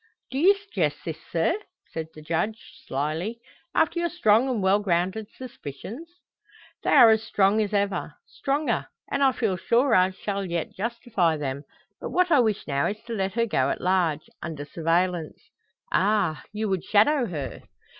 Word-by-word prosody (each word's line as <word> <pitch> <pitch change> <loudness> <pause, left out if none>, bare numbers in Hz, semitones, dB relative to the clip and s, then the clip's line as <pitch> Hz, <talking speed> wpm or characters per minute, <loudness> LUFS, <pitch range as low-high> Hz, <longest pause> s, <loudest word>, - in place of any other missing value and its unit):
do 265 - -2
you 385 +6 +6
suggest 195 - -1
this, 160 -2 -4
sir," 165 - +2 0.4
said 160 -1 -4
the 155 - -11
Judge, 170 +8 -2 0.2
slyly. 155 - -2 0.4
"After 325 +2 +2
your 345 0 0
strong 240 -6 +3
and 245 -4 0
well 190 +2 +4
grounded 190 +2 0
suspicions?" 240 - -8 0.7
"They - - -2
are 240 -6 +8
as 220 0 +3
strong 205 0 +2
as 210 -1 -1
ever, 200 -6 -1
stronger: 285 +3 -1 0.2
and - - 0
I 270 -1 +5
feel 220 -7 -1
sure 235 +8 +2
I 185 -1 +5
shall 200 +1 -4
yet 170 -3 -3
justify 210 -6 0
them. 140 -1 -4 0.3
But - - -5
what 365 -1 +2
I 295 - +6
wish 220 -4 +1
now 140 -1 0
is 210 - -3
to 235 - -6
let 195 -3 -1
her 230 0 +2
go 135 - +1
at - - -2
large, 175 -5 +1
under 155 -4 -5
surveillance." 165 +2 -1 0.4
"Ah! 195 -5 +2
you 215 +1 -2
would 190 -3 -1
shadow 245 +5 +3
her?" 150 -7 -5
200 Hz, 170 wpm, -25 LUFS, 165-235 Hz, 0.7 s, are